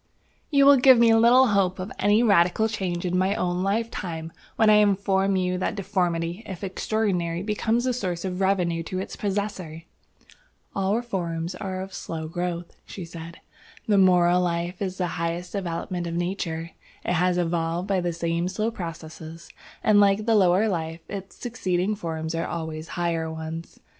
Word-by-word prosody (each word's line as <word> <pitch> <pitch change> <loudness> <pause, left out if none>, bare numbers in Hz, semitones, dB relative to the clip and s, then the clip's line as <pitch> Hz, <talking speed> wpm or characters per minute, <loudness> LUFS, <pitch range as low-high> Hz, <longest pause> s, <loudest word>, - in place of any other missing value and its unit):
"You 280 -2 +4
will 280 0 +8
give 260 0 +7
me 230 -1 +6
little 240 +3 +6
hope 195 -3 +2
of 185 +2 -5
any 205 +3 +4
radical 200 0 +4
change 185 -5 -3
in 180 0 0
my 190 +2 +1
own 180 0 -1
lifetime 190 -6 -2 0.2
when 220 - +3
I 210 0 +7
inform 195 -1 +2
you 180 -1 0
that - - -1
deformity, 180 -2 -1
if 190 0 -7
extraordinary, 185 -3 -1
becomes 220 +3 0
a 255 - +1
source 185 -7 -3
of 185 0 -3
revenue 180 -3 +1
to 185 +3 -5
its 190 - -5
possessor." 195 -5 -3 0.9
"All 195 +1 +1
reforms 175 -7 -3
are 185 0 -5
of 190 0 -8
slow 160 -1 -5
growth," 175 +1 -4
she 185 - -8
said. 165 0 -10 0.5
"The 205 -2 +4
moral 180 -1 +5
life 175 +1 -2
is 190 -2 -3
the 180 - 0 0.2
highest 170 +2 -3
development 175 -2 -3
of 170 - -4
Nature. 170 -2 -3 0.3
It 175 -1 +1
is 180 - 0
evolved 170 +1 -1
by 195 -2 +1
the 175 0 -1
same 170 +1 -1
slow 215 +5 -1
processes, 165 -3 -8 0.3
and 210 -1 +5
like 200 +1 +4
the 230 - +3
lower 195 0 +4
life, 165 -4 -3
its 195 -1 -7
succeeding 190 -5 -1
forms 160 -5 -4
are 165 +1 -2
always 160 -1 -5
higher 165 -2 -1
ones. 160 +1 -7
180 Hz, 170 wpm, -25 LUFS, 170-200 Hz, 0.9 s, will